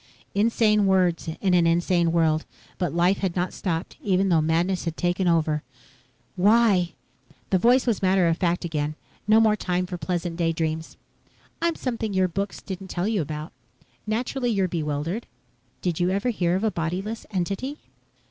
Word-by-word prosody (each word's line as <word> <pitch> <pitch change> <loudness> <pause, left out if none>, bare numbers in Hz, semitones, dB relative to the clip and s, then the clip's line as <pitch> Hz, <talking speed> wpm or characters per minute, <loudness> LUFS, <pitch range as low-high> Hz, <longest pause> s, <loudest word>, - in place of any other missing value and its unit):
Insane 210 -1 +3
words 180 -4 +2
in 190 -2 +2
an 175 -2 +4
insane 170 0 +2
world. 160 -2 +2 0.4
But 175 -5 0
life 175 +3 +2
had 190 -3 -1
not 180 0 -1
stopped 170 -3 -3
even 195 -1 +2
though 165 -3 +4
madness 170 +4 0
had 165 -1 -3
taken 180 +1 0
over. 155 -3 +2 0.7
"Why?" 200 -3 +4 0.6
The 190 - +4
voice 245 +6 +4
was 235 -5 0
matter 185 -2 +3
of 165 - +2
fact 175 -1 0
again. 155 -2 -2 0.3
No 215 +1 +6
more 220 -1 +4
time 180 -3 -1
for 180 -1 -6
pleasant 170 +1 -3
daydreams. 160 -1 -2 0.6
"I'm 335 -1 +1
something 225 -5 -3
your 190 -1 +3
books 195 +3 -4
didn't 190 0 -6
tell 180 +1 -2
you 215 -4 +1
about. 155 +1 -5 0.6
Naturally 245 +3 -1
you're 195 -4 +1
bewildered. 160 +5 -3 0.6
Did 175 -2 -1
you 175 0 +2
ever 200 +6 0
hear 175 -5 0
of 190 - -1
a 220 - +2
bodyless 185 +7 -3
entity?" 200 - -2
180 Hz, 165 wpm, -25 LUFS, 170-205 Hz, 0.7 s, No